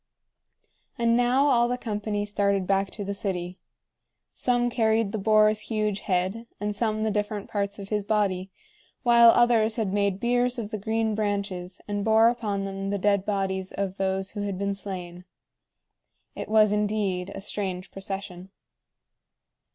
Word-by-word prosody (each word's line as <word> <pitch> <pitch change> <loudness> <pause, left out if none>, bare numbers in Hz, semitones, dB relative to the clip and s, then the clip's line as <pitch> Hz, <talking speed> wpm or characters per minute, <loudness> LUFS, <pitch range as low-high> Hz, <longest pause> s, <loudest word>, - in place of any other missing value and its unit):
And 235 -1 +2
now 245 +3 +3
all 240 -4 +4
the 250 +1 -1
company 210 -3 -3
started 200 -2 +1
back 195 +1 +1
to 205 - -6
the 200 - -2
city. 180 -3 -4 0.7
Some 245 -1 +1
carried 220 -3 +2
the 220 - -3
boar's 215 +1 +4
huge 215 -2 0
head, 190 +4 -1
and 210 0 -2
some 215 0 0
the 220 - +1
different 210 0 -2
parts 200 -1 -2
of 200 -1 -8
his 210 -1 -1
body, 195 -3 0 0.5
while 235 -2 +7
others 230 -2 +4
had 215 -5 -1
made 200 -1 +1
biers 245 +2 +1
of 220 -3 -5
the 215 - -3
green 220 +1 0
branches, 200 -3 -3
and 205 -1 -2
bore 220 +1 +5
upon 210 -5 -2
them 195 0 -4
the 200 - 0
dead 200 0 +1
bodies 190 -2 -1
of 195 -1 -3
those 190 0 -1
who 205 - -5
had 200 -2 -3
been 200 +1 -1
slain. 180 -3 -7 1.1
It - - -6
was 215 -1 +5
indeed 205 -3 0
a - - -5
strange 190 -2 -4
procession. 195 -1 -6
205 Hz, 160 wpm, -26 LUFS, 195-220 Hz, 1.1 s, while